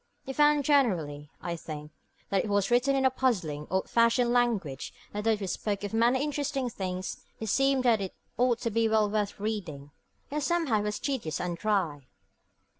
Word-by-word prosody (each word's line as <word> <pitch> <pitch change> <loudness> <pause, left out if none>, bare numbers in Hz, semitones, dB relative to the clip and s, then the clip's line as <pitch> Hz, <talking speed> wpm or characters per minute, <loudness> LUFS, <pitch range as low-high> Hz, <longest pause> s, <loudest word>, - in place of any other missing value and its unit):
You 270 - -4
found 295 0 +4
generally, 175 - +1
I 170 -1 -2
think, 150 -2 -8 0.4
that 195 -1 +2
it - - -4
was 200 0 +1
written 250 +3 +3
in 265 -1 +2
a 260 - +5
puzzling, 180 - -1
old 190 0 0
fashioned 235 +1 +3
language, 215 - 0 0.2
that 210 +1 -4
though 225 -1 +3
it 195 - -3
spoke 200 +2 -2
of 205 - -4
many 240 +4 +3
interesting 285 -3 -2
things, 185 -2 -4 0.2
and 220 - -4
seemed 270 +4 +2
that 230 -4 +4
it 190 - -5 0.2
ought 245 -1 +3
to 230 - -1
be 225 +1 +2
well 215 -2 +3
worth 210 -2 -1
reading, 175 -10 -4 0.4
yet 300 +1 -1
somehow 315 -8 +1
it - - -2
was 210 0 -1
tedious 230 - -2
and 175 -1 -2
dry. 170 -9 -1
215 Hz, 190 wpm, -29 LUFS, 185-255 Hz, 0.4 s, a